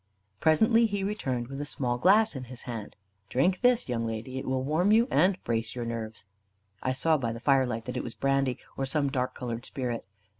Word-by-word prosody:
Presently 220 +9 +4
he 200 -2 -2
returned, 130 - -2
with 135 +2 -6
a - - -3
small 125 -4 -1
glass 210 - +4
in 130 -1 -5
his 125 0 -10
hand. 115 -4 -6 0.3
"Drink 180 +9 +2
this, 250 -1 +3
young 115 -2 -1
lady. 115 +4 -4
It - - -7
will 130 0 0
warm 160 +8 +2
you, 230 +3 +5
and 185 +5 +4
brace 115 0 -1
your 120 -1 -3
nerves." 115 -3 -5 0.6
I 130 - 0
saw 155 +4 +2
by 115 -3 -1
the 115 - -6
firelight 125 -3 +2
that 125 - -4
it - - -2
was 120 - -6
brandy, 135 -2 +1 0.2
or 135 - -2
some 140 0 0
dark 130 -2 -1
coloured 120 -1 -4
spirit. 125 -5 -4
130 Hz, 210 wpm, -28 LUFS, 120-160 Hz, 0.6 s, you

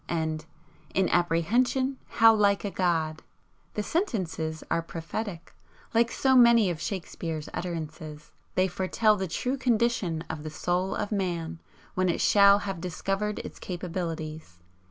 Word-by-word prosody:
and 160 -2 -2 0.5
'In 190 -1 +3
apprehension 240 +11 +1
how 225 +1 +6
like 205 -1 +2
a 200 - -2
god!' 160 -4 0 0.5
The 210 - -1
sentences 165 - -2
are 165 - +2
prophetic, 165 +3 -6 0.4
like 230 +1 +4
so 265 -1 +2
many 235 -5 +6
of 160 - -6
Shakespeare's 165 -5 -4
utterances. 155 -3 -6 0.2
They 185 +1 +3
foretell 190 +4 +2
the 190 -2 -3
true 250 +11 -2
condition 235 -9 +1
of 155 -1 -5
the 155 - -5
Soul 180 +4 -1
of 210 - -3
Man 170 -4 -2 0.3
when 185 0 +1
it 170 - 0
shall 200 -1 +6
have 190 -4 -4
discovered 195 +4 -2
its - - -9
capabilities. 165 - -5
180 Hz, 135 wpm, -27 LUFS, 165-210 Hz, 0.5 s, how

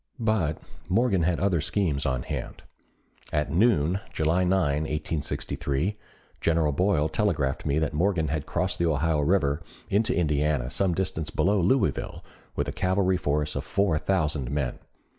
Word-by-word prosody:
But 105 -9 0 0.3
Morgan 100 -1 +2
had 85 0 +1
other 95 -4 +1
schemes 80 -7 0
on 65 -2 -1
hand. - - -6 0.7
At 75 -1 0
noon 90 -3 +3
July 80 +4 +1
9, 90 - +1 0.4
1863, 75 +2 -2 0.5
General 80 -2 +2
Boyle 80 0 +2
telegraphed 75 -6 -1
me 70 +1 +1
that 80 -2 0
Morgan 85 -1 +1
had 75 -1 -2
crossed - - -1
the 85 - +2
Ohio 80 0 +1
River 75 -2 +2 0.3
into 105 -3 +2
Indiana 75 -5 +1
some 95 -1 +1
distance 80 -4 -2
below 100 +4 +2
Louisville 85 - 0 0.3
with - - -1
a - - -2
cavalry 95 0 +1
force 75 -1 -1
of - - -2
four 100 -6 +1
thousand 75 -9 0
men. 70 -3 -2
80 Hz, 145 wpm, -26 LUFS, 75-95 Hz, 0.7 s, noon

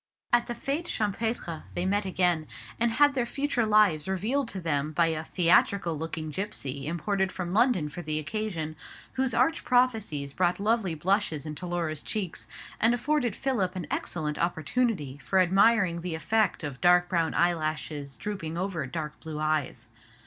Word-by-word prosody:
At 240 0 +4
the 240 - -3
fête 280 +7 -2
champêtre 210 - -2
they 175 - -1
met 200 +2 +1
again; 175 -4 +1 0.3
and 235 0 +2
had 290 +3 +5
their 250 -3 0
future 275 -4 0
lives 205 -8 +4
revealed 225 +8 0
to 195 - -4
them 155 -3 -1
by 165 +1 +3
a 160 -1 -2
theatrical 170 +1 +3
looking 160 0 -4
gipsy 145 -7 -4
imported 190 +4 0
from 180 -1 -4
London 215 - +3
for 175 +4 -7
the 155 -2 -2
occasion, 160 -1 -3 0.4
whose 260 -3 0
arch 265 +7 +2
prophecies 220 - +1
brought 180 0 +1
lovely 205 -4 +1
blushes 170 -2 0
into 155 +4 -6
Laura's 165 -4 -2
cheeks, 195 -6 -4 0.3
and 230 +2 +4
afforded 250 -3 0
Philip 205 -9 -1
an 180 -3 -4
excellent 150 -3 -2
opportunity 170 - -1
for 190 - -1
admiring 190 -1 +4
the 175 -2 -3
effect 210 +4 +1
of 140 -4 -5
dark 180 0 +5
brown 170 -2 0
eyelashes 155 -5 -1
drooping 170 - -4
over 175 -6 -2
dark 150 +1 -5
blue 160 -1 -6
eyes. 150 -6 -1
180 Hz, 160 wpm, -28 LUFS, 155-220 Hz, 0.4 s, had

